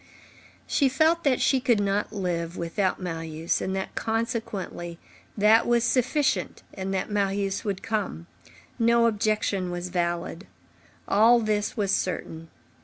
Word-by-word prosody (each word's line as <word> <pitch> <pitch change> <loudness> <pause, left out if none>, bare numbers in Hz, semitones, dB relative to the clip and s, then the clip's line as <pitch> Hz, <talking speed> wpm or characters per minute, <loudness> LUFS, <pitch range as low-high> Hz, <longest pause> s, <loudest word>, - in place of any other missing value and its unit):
She 275 -3 +2
felt 320 +5 +2
that 265 -3 +3
she 265 - +3
could 240 -4 +2
not 200 +1 0
live 175 -4 -3
without 180 +3 -1
Marius, 165 -2 -3
and 190 - -2
that, 190 - -4
consequently, 220 -6 -3 0.4
that 215 +2 +5
was 240 -1 +3
sufficient 265 +4 0
and 190 0 -4
that 190 +2 -2
Marius 200 -1 0
would 200 -3 -3
come. 205 -6 -3 0.5
No 235 0 +4
objection 210 -4 0
was 175 0 -4
valid. 175 0 -2 0.6
All 225 +4 +5
this 215 -1 -1
was 200 -2 0
certain. 165 -4 -2
200 Hz, 130 wpm, -26 LUFS, 180-230 Hz, 0.6 s, that